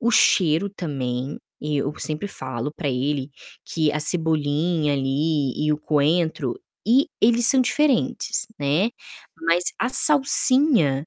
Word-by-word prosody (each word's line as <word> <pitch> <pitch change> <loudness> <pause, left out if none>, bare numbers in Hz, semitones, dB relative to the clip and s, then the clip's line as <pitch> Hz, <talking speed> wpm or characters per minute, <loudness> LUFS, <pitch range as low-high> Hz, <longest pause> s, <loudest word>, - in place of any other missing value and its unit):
o 235 - +1
cheiro 180 -4 +3
também, 135 -7 -4 0.2
eu 150 -1 -2
sempre 155 +6 -4
falo 130 -4 -6
pra 145 - -4
ele 135 +2 -2 0.3
que 155 -2 0
a 150 - -2
cebolinha 155 -1 0
ali, 140 +1 -1
e 150 - +2
o 150 - -2
coentro 160 - 0 0.3
e 255 +5 +4
eles 235 +2 +3
são 265 0 +4
diferentes, 260 -1 0
né. 150 +10 +1 0.6
Mas 170 +1 +3 0.2
a 235 - 0
salsinha, 260 - +3
155 Hz, 125 wpm, -22 LUFS, 145-215 Hz, 0.6 s, e